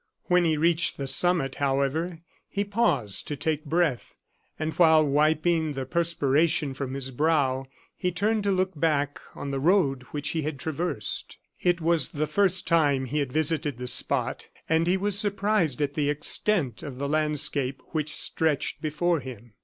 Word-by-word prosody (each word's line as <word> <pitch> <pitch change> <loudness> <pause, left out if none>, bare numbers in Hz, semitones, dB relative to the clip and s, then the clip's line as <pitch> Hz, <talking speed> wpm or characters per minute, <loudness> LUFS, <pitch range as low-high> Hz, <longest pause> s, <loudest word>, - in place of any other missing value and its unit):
When 180 -1 +2
he 160 -2 +1
reached 165 +1 +2
the 140 - -4
summit, 155 -2 +1
however, 140 +5 -1 0.3
he 200 - -1
paused 170 - 0
to 145 - -3
take 155 +2 -2
breath; 160 -4 -1 0.4
and 155 0 -3
while 160 -3 +5
wiping 155 +2 +1
the 135 -1 -4
perspiration 155 -2 +1
from 135 0 -5
his 135 -1 -3
brow, 135 -2 +1 0.3
he 180 -1 -2
turned 210 +5 0
to 200 - +2
look 185 0 +1
back 145 -3 0 0.2
on 140 - -5
the 135 - -2
road 145 -4 +2
which 150 0 -3
he 160 - -1
had 150 -1 -4
traversed. 155 - -3 0.2
It 175 -1 +1
was 165 -2 +2
the 155 +1 -2
first 185 +3 +2
time 150 -5 +2
he 150 +4 -2
had 140 -3 -2
visited 155 -2 0
the 125 - -6
spot, 125 +1 0 0.2
and 165 +1 +2
he 185 +2 +3
was 200 +1 +3
surprised 200 - +1
at 145 0 -2
the 145 -1 0
extent 150 - 0
of 135 -4 -7
the 140 +1 -3
landscape 145 -3 0
which 155 -1 -3
stretched 160 -3 -1
before 165 +2 0
him. 120 -4 -10
155 Hz, 170 wpm, -26 LUFS, 140-170 Hz, 0.4 s, while